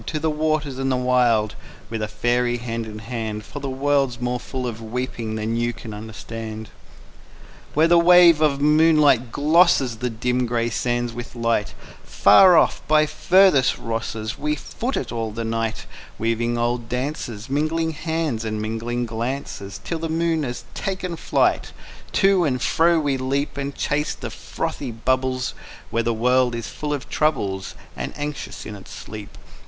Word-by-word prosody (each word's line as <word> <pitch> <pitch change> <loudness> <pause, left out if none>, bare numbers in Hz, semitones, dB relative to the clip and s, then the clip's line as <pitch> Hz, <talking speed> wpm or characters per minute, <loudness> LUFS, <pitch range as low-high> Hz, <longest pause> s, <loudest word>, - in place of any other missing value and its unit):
To 155 - -2
the 160 +1 0
waters 150 -3 -1
and 135 0 0
the - - +2
wild 120 -4 +2 0.4
With 115 -1 -3
a 105 - -1
faery, 120 +3 0
hand 115 -1 -4
in 105 -1 -8
hand, 110 -1 -5
For 145 - -7
the 140 -1 -4
world's 135 -2 +1
more 125 0 -1
full 130 +1 -5
of 115 -2 -5
weeping 115 -1 -4
than 110 +1 -2
you 120 0 0
can 110 -1 -9
understand._ 110 +1 -7 1.1
Where 155 +2 +5
the 170 0 +6
wave 170 -2 +7
of 145 -3 +3
moonlight 150 -5 +4
glosses 145 -5 +3
The 125 +2 -2
dim 125 +2 -1
gray 115 0 0
sands 120 +1 -1
with 120 +1 -8
light, 115 -3 0 0.3
Far 175 - +6
off - - +3
by 155 0 +5
furthest 155 -2 +4
Rosses 115 -1 -4
We 150 +1 0
foot 245 - -4
it - - -3
all 115 -2 -2
the 115 +2 -5
night, 115 0 -2 0.3
Weaving 115 +1 0
olden 120 0 -1
dances, 125 -3 -4
Mingling 155 +4 0
hands 160 -6 -2
and 110 -1 -3
mingling 115 +3 -2
glances 115 -3 -4
Till 165 - -3
the 165 0 -3
moon 165 0 +1
has 120 -3 -4
taken 185 -3 -3
flight; - - +1 0.4
To 195 -2 +4
and 130 -5 0
fro 165 +5 +3
we 145 -3 0
leap 140 +3 -1
And 140 0 -4
chase 150 +1 -1
the - - -6
frothy - - -4
bubbles, 130 +2 -1 0.4
While 115 - +1
the 115 - +1
world 125 +2 +2
is 115 - -5
full 150 -1 -5
of 145 -2 -3
troubles 100 -11 -1 0.2
And - - -5
is - - -13
anxious 145 0 -5
in 105 - -6
its 100 - -12
sleep. 105 -1 -9
125 Hz, 170 wpm, -22 LUFS, 115-150 Hz, 1.1 s, wave